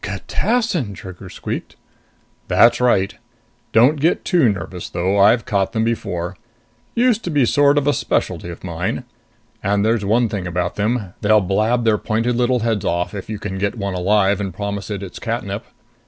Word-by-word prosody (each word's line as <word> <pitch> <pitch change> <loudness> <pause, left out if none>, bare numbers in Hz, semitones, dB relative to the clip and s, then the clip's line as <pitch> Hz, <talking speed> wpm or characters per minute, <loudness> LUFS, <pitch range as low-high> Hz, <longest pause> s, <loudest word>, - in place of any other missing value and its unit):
"Catassin!" 190 - -1
Trigger 95 +1 -10
squeaked. - - -6 0.7
"That's 115 +1 +5
right. 105 -5 +2 0.6
Don't 130 +7 +5
get 160 +5 +1
too 155 -11 +4
nervous 95 -3 -6
though. 95 +3 0
I've 110 +4 +5
caught 100 -6 0
them 110 - +1
before. 95 -6 -2 0.6
Used 235 -2 +2
to - - -2
be 145 -4 +2
a - - +4
sort 145 +3 +4
of 145 0 +2
specialty 85 - -1
of 85 - -9
mine. 90 0 -3 0.6
And 100 +1 +1
there's 110 -1 +1
one 115 +4 +2
thing 100 -4 -4
about 90 0 -1
them 105 -2 -1
they'll 110 +1 +5
blab 110 +5 +1
their 110 -2 +3
pointed 115 +3 0
little 125 0 +1
heads 110 -3 0
off 90 +1 -1
if 100 -1 -7
you 110 - -3
can 95 -2 -5
get 100 +4 -1
one 100 -2 -3
alive 100 +2 +2
and 95 -2 -3
promise 100 0 -4
it 100 -2 -4
its 95 - -8
catnip...." - - -3
105 Hz, 175 wpm, -20 LUFS, 95-120 Hz, 0.7 s, That's